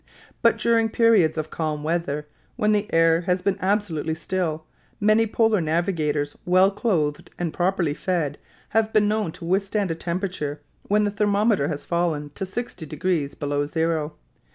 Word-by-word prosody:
But - - +4
during 230 -1 +2
periods 215 -9 +4
of 155 0 -3
calm 155 -2 -2
weather, 155 -2 -1 0.3
when 215 -3 +2
the 210 0 0
air 165 0 +4
has 180 0 +1
been 200 -1 0
absolutely 185 -6 0
still, 160 -2 -2 0.3
many 215 +2 +4
polar 220 -2 +2
navigators, 155 -3 0
well 185 +2 +4
clothed 170 -9 -1
and 170 -3 -2
properly 175 -4 +1
fed, 155 -4 -2 0.3
have 220 0 +1
been 210 -1 +3
known 215 -4 0
to - - -10
withstand 195 +1 0
a - - +1
temperature 170 -4 -3 0.3
when 210 +1 +3
the 205 - 0
thermometer 205 -4 +2
has 145 -2 -4
fallen 165 -4 -1
to 190 - -4
60 210 -3 -5
degrees 155 -2 -1
below 145 0 -1
zero. 160 -1 -1
175 Hz, 155 wpm, -24 LUFS, 155-205 Hz, 0.3 s, But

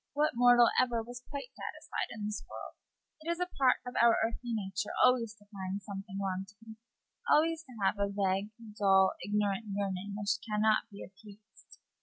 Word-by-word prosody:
What 300 +1 +2
mortal 245 0 +6
ever 240 -3 0
was 245 +1 -9
quite 280 -3 -6
satisfied - - -5
in 215 -2 -6
this 210 0 -3
world? - - -8 0.5
It 320 - -6
is 340 0 -1
a 360 - +1
part 270 -7 +3
of 250 - -6
our 235 -1 +6
earthly 235 +1 -4
nature 195 -2 -2 0.2
always 235 -3 +2
to 205 -1 -22
find 190 0 -4
something 195 0 -7
wanting, 200 +3 -5 0.5
always 325 +1 +3
to 255 - -14
have 200 +2 +2
a 200 0 +1
vague, 195 0 0 0.3
dull, 190 -1 +5
ignorant 205 +1 0
yearning 200 0 -3
which 210 +1 0
can 210 -2 -2
not 220 +1 +3
be 200 -2 -9
appeased. 210 +2 -17
210 Hz, 175 wpm, -32 LUFS, 200-240 Hz, 0.5 s, mortal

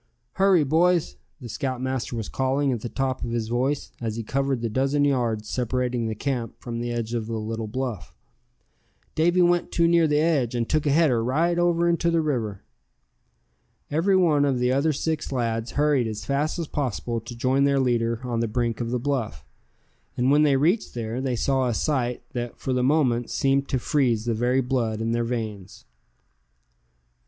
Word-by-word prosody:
"Hurry, 190 -4 +4
boys!" 165 +4 +2 0.2
the 125 - -8
scoutmaster 130 -1 -3
was 110 -3 -4
calling 135 +1 0
at 120 -4 -2
the 120 - -5
top 130 0 -2
of - - -3
his 115 -1 -2
voice, 130 +4 -1
as 110 -2 -3
he 115 - -4
covered 135 +1 -1
the 115 - -1
dozen 135 +5 +1
yards 120 -6 0
separating 125 -1 -1
the 110 - -3
camp 120 0 -3
from 120 -2 -5
the 120 0 -3
edge 115 -1 -3
of 115 -2 -2
the 115 -1 -3
little 110 +1 -4
bluff; 120 -3 -4 1.0
"Davy 175 +3 +3
went 175 0 +2
too 170 -1 +3
near 170 -1 +4
the 150 -1 +2
edge, 150 -7 +1
and 115 -1 -1
took 155 -1 0
a - - +3
header 140 -7 +3
right 165 +8 +1
over 170 0 +2
into 170 0 +2
the 165 0 +2
river!" 115 -10 -2 1.3
Every 170 +6 +2
one 160 -6 +4
of 140 -3 +1
the 125 0 +1
other 140 +4 +2
six 155 +1 -2
lads 115 -3 -2
hurried 145 -5 +2
as 110 -1 -5
fast 145 +4 -1
as 170 - -2
possible 120 -5 -2
to 120 +2 -9
join 130 +3 +2
their 140 -1 +2
leader 115 -2 0
on 120 -2 -2
the 115 - 0
brink 115 +1 -1
of 115 - -2
the 125 - 0
bluff; 130 -3 -3 0.7
and 125 +2 +2
when 145 +1 +5
they 145 -2 +4
reached 175 - +1
there, 115 +1 -3
they 130 -2 -1
saw 130 +2 +1
a 120 - -1
sight 125 -4 -1
that 120 -1 -5
for 130 - -2
the 125 - +1
moment 125 -4 +2
seemed 135 0 +1
to 130 - +1
freeze 120 -4 +1
the 120 - 0
very 125 +4 +1
blood 120 -4 -1
in 115 0 -1
their 120 0 0
veins. 110 -5 -5
130 Hz, 190 wpm, -25 LUFS, 115-145 Hz, 1.3 s, when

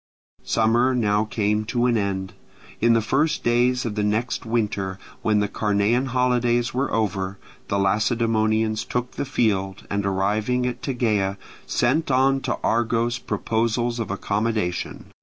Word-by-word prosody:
Summer 120 +3 +2
now 105 -2 +2
came 105 0 0
to 120 +2 0
an 120 -1 +3
end. 95 -3 -2 0.5
In 115 +1 +4
the 115 -1 +2
first 145 +8 +1
days 125 +1 +2
of 115 - -2
the 105 - -1
next 110 +3 -1
winter, 105 -4 -1 0.2
when 105 -1 +2
the 105 - +1
Carnean 105 +5 +1
holidays 120 -1 +1
were 130 +2 -1
over, 100 -3 -1 0.3
the 100 - 0
Lacedaemonians 110 +1 +1
took 125 +1 -3
the - - -4
field, 100 -8 -1
and 100 0 0
arriving 105 +6 0
at 125 0 -3
Tegea 105 -7 0 0.3
sent 140 +7 +1
on 135 +1 +3
to - - -2
Argos 120 +1 +1
proposals 115 +2 -1
of 115 - -3
accommodation. 100 -1 -2
110 Hz, 140 wpm, -23 LUFS, 105-120 Hz, 0.5 s, In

